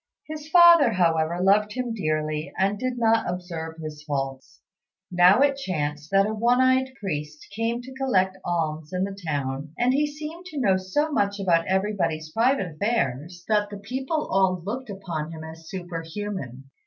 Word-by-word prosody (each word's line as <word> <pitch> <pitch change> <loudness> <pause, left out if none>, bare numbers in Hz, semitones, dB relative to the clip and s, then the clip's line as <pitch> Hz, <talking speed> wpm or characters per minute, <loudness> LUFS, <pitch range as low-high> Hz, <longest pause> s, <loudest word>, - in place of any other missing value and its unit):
His 305 0 -8
father, 340 -7 +7
however, 165 -2 +2
loved 205 +3 +3
him 250 -2 -3
dearly, 155 -5 -2
and 200 +2 +1
did 255 0 -2
not 225 -3 +2
observe 170 -3 -5
his 155 -2 -7
faults. 135 -3 -4 0.5
Now 180 +6 +6
it 280 -1 +3
chanced 150 - -3
that 195 0 +4
a 215 - -2
one 235 +3 +2
eyed 260 0 +3
priest 150 -5 -5
came 230 +2 -1
to 260 +1 -10
collect 195 -9 +1
alms 160 -2 -2
in 180 0 0
the 195 0 -3
town, 140 0 -3
and 245 +1 +2
he 295 +2 +2
seemed 305 +4 -8
to 310 -6 -6
know 200 -7 +3
so 290 +12 -1
much 200 -6 0
about 170 -4 +2
everybody's 190 -5 -1
private 225 - +1
affairs 175 - -1
that 210 -1 +2
the 205 - -7
people 260 +9 -3
all 185 -2 +2
looked 245 +4 -4
upon 170 -6 -5
him 160 -1 -8
as 160 0 -10
superhuman. 165 - -6
190 Hz, 165 wpm, -25 LUFS, 160-240 Hz, 0.5 s, father